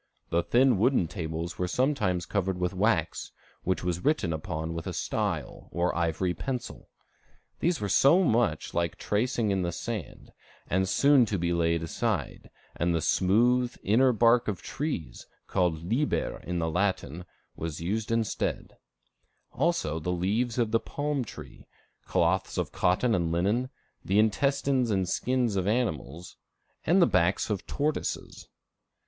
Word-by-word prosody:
The 85 - +3
thin 125 +1 +3
wooden 120 -5 +3
tables 80 -1 -5
were 90 - 0
sometimes 105 -5 0
covered 95 -2 -1
with 90 +1 -1
wax, 95 -4 0 0.3
which 95 -1 -1
was 90 -1 -2
written 140 - +1
upon 80 +1 -4
with 85 -1 -5
a - - -3
style, - - -3
or 85 +1 0
ivory 85 +2 0
pencil. 125 +7 -5 0.7
These 170 -2 +1
were 105 - -2
so 140 - +5
much 120 - +1
like 85 -2 0
tracing 110 0 0
in 95 -1 +1
the 85 -1 -1
sand, 105 +1 -6 0.4
as 95 +1 +1
soon 140 -1 +5
to 100 - -1
be 85 0 0
laid 85 -1 +1
aside, 95 - -3 0.3
and 85 0 0
the - - +1
smooth, 120 +9 +2
inner 125 +6 +4
bark 120 +1 +4
of 100 -5 -3
trees, 145 - -4 0.2
called 85 -4 0
liber 120 - -1
in 90 0 -2
the 80 -1 -1
Latin, 90 -3 -1 0.3
was 80 -2 -5
used 105 +6 -2
instead; 115 -2 -2 0.7
also 135 - 0
the 90 +3 -2
leaves 105 +7 0
of 115 -3 +1
the 115 - +3
palm 145 0 -2
tree, 110 - -11 0.4
cloths - - +1
of - - -1
cotton 105 +7 +2
and 85 -5 0
linen, 105 +9 +1 0.3
the 95 - +1
intestines 130 +3 +2
and 95 -3 +1
skins 125 +1 0
of 95 -1 0
animals, 95 - -2 0.5
and 180 +2 +5
the - - +7
backs 90 - +1
of 100 -2 -3
tortoises. 150 +1 -3
100 Hz, 150 wpm, -28 LUFS, 85-125 Hz, 0.7 s, the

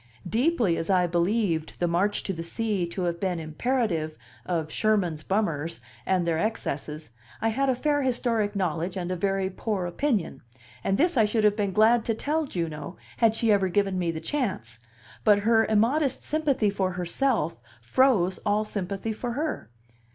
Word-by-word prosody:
Deeply 230 - +2
as 165 - -4
I 185 -2 +4
believed 175 -1 0
the 175 - +1
March 185 +5 +1
to 195 - -2
the 165 - -5
Sea 195 +1 -1
to 180 +2 -4
have 170 -1 -1
been 180 -2 -1
imperative, 165 -1 -1 0.3
of 160 -3 -1
"Sherman's 195 -8 +1
bummers" 165 - -1 0.3
and 185 -2 +2
their 165 -1 +1
excesses 155 - -3 0.3
I 225 - +1
had 270 +5 +1
a 260 - +2
fair 290 +3 +1
historic 235 -5 0
knowledge 180 -1 -1
and 180 -1 -3
a - - 0
very 195 +1 0
poor 195 -1 -2
opinion; 175 - -1 0.4
and 195 - +1
this 335 +1 +2
I 220 - +6
should 215 +1 0
have 210 -1 +4
been 205 -2 0
glad 220 +3 +4
to 225 - 0
tell 300 +6 -1
Juno, 165 - -4 0.2
had 225 -1 +3
she 225 -1 +2
ever 195 -2 +3
given 195 0 +1
me 175 -2 0
the 165 -1 -2
chance; 160 - -3 0.4
but 205 -1 +5
her 225 -1 +4
immodest 250 +6 +2
sympathy 285 -9 +1
for 190 -2 -1
herself 180 - 0 0.3
froze 190 - +3
all 210 +1 +1
sympathy 200 +1 -3
for 240 +2 -4
her. 295 - -3
200 Hz, 175 wpm, -26 LUFS, 170-230 Hz, 0.4 s, I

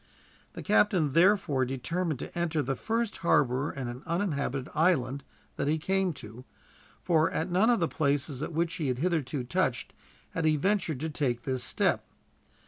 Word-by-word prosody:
The - - -7
captain 145 - +3
therefore 170 -6 +4
determined 150 +5 -2
to - - -8
enter 165 -3 0
the 135 +2 -1
first 225 - -2
harbor 140 -4 +2
in 135 -3 -5
an 120 +2 -6
uninhabited 150 -7 -1
island 140 -5 +1 0.3
that 140 - -1
he 155 +2 +2
came 190 +3 0
to, 120 -2 -10 0.6
for 165 -2 +3
at 175 +3 -2
none 195 +6 +4
of 240 - +3
the 165 - +2
places 140 -2 -1
at 155 - -3
which 165 +1 -1
he 155 -5 -2
had 125 -1 0
hitherto 150 -4 -1
touched 120 - -1 0.4
had 165 - -2
he 155 -1 +4
ventured 175 -3 0
to 160 - -2
take 125 -6 -1
this 130 -1 -2
step. - - +1
155 Hz, 170 wpm, -29 LUFS, 130-175 Hz, 0.6 s, therefore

